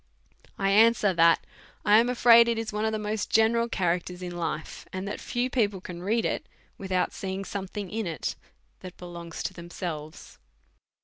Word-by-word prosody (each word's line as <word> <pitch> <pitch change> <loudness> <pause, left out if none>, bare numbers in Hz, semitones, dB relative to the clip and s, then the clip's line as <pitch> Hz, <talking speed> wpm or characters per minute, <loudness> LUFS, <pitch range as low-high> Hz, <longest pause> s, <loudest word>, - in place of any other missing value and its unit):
1 195 - -1
answer, 215 -1 +5
that 165 -1 +4 0.4
i 210 +1 +7
am 235 +2 +2
afraid 235 -1 +7
it 235 -1 +1
is 225 -1 -4
one 210 +1 -1
of 220 - +1
the 220 - -1
most 210 0 -3
ge - - +4
neral 230 +1 +2
characters 180 0 -1
in 175 -1 -5
life; 160 -2 -4
and 185 +1 -4
that 205 - -5
few 245 +1 -1
people 210 -7 0
can 175 -1 -8
read 220 +5 0
it, - - -1 0.3
without 190 -2 -1
seeing 190 0 -4
sometiiing 195 0 -5
in 220 -2 -2
it 160 -6 -3 0.4
that 185 -1 -10
belongs 170 -2 -7
to - - -3
themselves. 170 -3 -7
195 Hz, 180 wpm, -27 LUFS, 175-220 Hz, 0.4 s, i